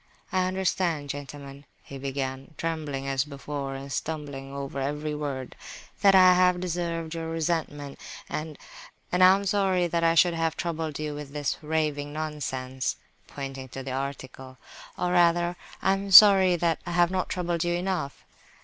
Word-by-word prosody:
"I 185 -1 +1
understand, 180 -6 -1
gentlemen," 140 0 -9 0.2
he 140 - -9
began, 135 +2 -4
trembling 150 -4 -3
as 135 -1 +1
before, 140 -1 -6
and 135 0 -7
stumbling 145 -4 -5
over 140 0 -5
every 150 +2 -2
word, 140 -4 -5 0.5
"that 200 -1 +6
I 185 -1 +8
have 180 0 +3
deserved 170 -2 -3
your 165 -1 -4
resentment, 160 -3 -3 0.3
and—and 160 +3 -6
am 190 +2 +6
sorry 190 -2 +2
that 170 0 -1
I 165 0 +4
should 175 0 +5
have 165 -1 -1
troubled 160 -3 -3
you 150 -1 -4
with 145 -1 -8
this 145 -2 -2
raving 150 -2 -1
nonsense" 130 -4 -3 0.3
(pointing 135 -2 -7
to 135 - -8
his 135 - -6
article), 130 -1 -6 0.4
"or 180 - -1
rather, 175 0 +3 0.3
I 190 - +4
am 195 +1 -3
sorry 190 -2 +9
that 170 -1 0
I 175 - -5
have 175 0 +3
not 185 -1 -1
troubled 175 -2 -1
you 175 0 0
enough." 180 -6 -3
155 Hz, 155 wpm, -27 LUFS, 140-175 Hz, 0.5 s, sorry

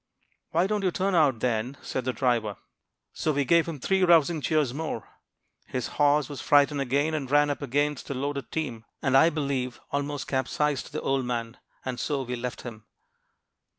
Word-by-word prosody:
"'Why 170 +3 +2
don't 210 +1 0
you 185 - +3
turn 190 +2 -1
out, 145 -9 +3
then?' 125 +2 -1
said 130 - -3
the 130 - +1
driver. 120 -5 0 0.6
"So 155 - 0
we 140 -1 0
gave 170 +3 +4
him 160 -4 -5
three 190 +7 +1
rousing 170 -2 +4
cheers 150 -4 +1
more. 155 -5 -4 0.6
His 125 -2 -3
horse 145 0 +3
was 145 -4 -7
frightened 145 0 +4
again, 140 +4 +1
and 140 -4 -3
ran 145 +1 +4
up 145 - -4
against 145 +2 -1
a 140 - -2
loaded 140 +1 -3
team, 130 -9 -3 0.2
and, 135 -1 +2
I 150 +5 +7
believe, 140 -5 -2
almost 145 0 -2
capsized 135 +2 -1
the 155 - -4
old 135 -1 0
man; 115 -1 -3 0.3
and 130 -2 -3
so 140 -3 -1
we 125 0 -4
left 120 -1 -5
him." 110 -3 -8
140 Hz, 185 wpm, -27 LUFS, 125-150 Hz, 0.6 s, I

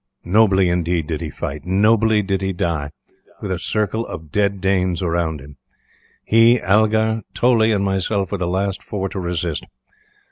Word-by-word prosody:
Nobly, 95 0 +4
indeed, 85 -2 0
did 80 -1 -4
he - - -4
fight; 70 +1 -6
nobly 105 +3 +3
did 95 -1 -1
he 95 0 -1
die, 80 -5 -2 0.5
with 100 - -5
a 90 - -2
circle 110 +4 -1
of 80 -2 -9
dead 100 0 0
Danes 95 -2 0
around 85 -3 -1
him. 70 +1 -14 0.7
He, 115 +2 +5
Algar, 110 +2 +2
Toley, 115 -2 +3
and 100 -2 +1
myself 95 0 -1
were 100 - -2
the 90 - -1
last 95 +2 -1
four 95 -2 -4
to 95 - -5
resist. 85 -3 -3
95 Hz, 165 wpm, -20 LUFS, 85-105 Hz, 0.7 s, He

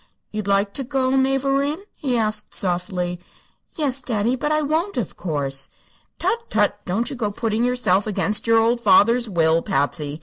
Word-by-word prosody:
"You'd 215 -2 -4
like 200 0 +2
to 275 - -2
go, 260 0 0
mavourneen?" 275 +2 +1 0.2
he 255 -4 -1
asked, 215 -1 -2
softly. 180 -1 -2 0.6
"Yes, 275 -4 0
daddy; 235 -1 0
but 295 +4 -2
I 305 0 +2
won't, 315 +4 -1
of 225 -8 -3
course." 140 -5 -2 0.5
"Tut 465 0 -1
tut! - - +1
don't 215 +7 -1
you - - -4
go 225 -4 -1
putting 220 +2 -1
yourself 240 -6 +1
against 210 +1 0
your 230 0 +5
old 230 +2 +2
father's 230 +3 +4
will, 165 -3 +2
Patsy. 145 +1 -2
225 Hz, 165 wpm, -22 LUFS, 185-265 Hz, 0.6 s, your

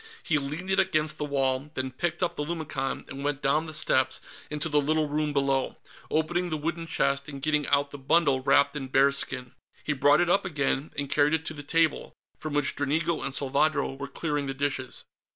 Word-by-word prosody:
He 155 -2 +2
leaned 150 +7 -4
it 190 - +4
against 155 -5 +1
the 150 - -1
wall, 135 0 0
then 130 0 -2
picked 175 +7 -2
up 170 -1 0
the 150 - -2
lumicon 150 -4 -3
and 135 +1 -7
went 145 -1 -2
down 150 +4 +2
the - - -5
steps 130 -4 +2 0.3
into 150 +1 -2
the 150 -2 +2
little 155 +1 +1
room 150 +1 -1
below, 135 -2 0 0.3
opening 175 +3 0
the 155 - -1
wooden 165 +2 -3
chest 140 -2 0
and 140 -2 -7
getting 150 0 0
out 145 0 +2
the 145 - -8
bundle 140 -1 +3
wrapped 140 +2 +3
in 135 -3 -4
bearskin. 135 -2 +1 0.3
He 155 - 0
brought 145 +2 +4
it 175 - +2
up 185 +3 +3
again 145 -4 -1
and 140 0 -2
carried 145 +2 +3
it 160 0 -4
to 155 - -4
the 145 - -6
table, 160 +2 +1 0.3
from 155 -2 -4
which 145 -2 +1
Dranigo 155 +4 0
and 135 - -3
Salvadro 140 +1 +1
were 140 +1 -6
clearing 150 -3 -2
the 135 - -3
dishes. 135 -2 -2
145 Hz, 205 wpm, -27 LUFS, 140-155 Hz, 0.3 s, it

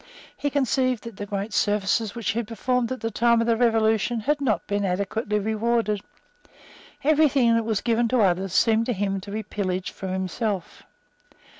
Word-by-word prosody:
He 285 - -2
conceived 255 -3 0
that 230 -4 -9
the 205 - -5
great 200 +2 -4
services 210 +1 +1
which 230 -5 -1
he 225 - -2
had 230 - -4
performed 245 +1 -1
at 260 - -4
the 225 0 -2
time 235 +2 +3
of 230 - +1
the 230 -1 +3
Revolution 225 0 +2
had 290 +5 0
not 235 -7 0
been 205 0 -1
adequately 200 +3 -1
rewarded. 220 0 0 1.0
Every 310 +1 +4
thing 250 -4 +3
that 230 -1 +1
was 220 -3 0
given 235 0 +1
to 245 0 +2
others 190 -1 +1
seemed 225 +3 +3
to 245 - +1
him 195 -1 -2
to 200 - -10
be 215 +2 -4
pillaged 190 -3 -3
from 190 -1 -6
himself. 190 +1 -3
220 Hz, 185 wpm, -24 LUFS, 200-235 Hz, 1.0 s, Every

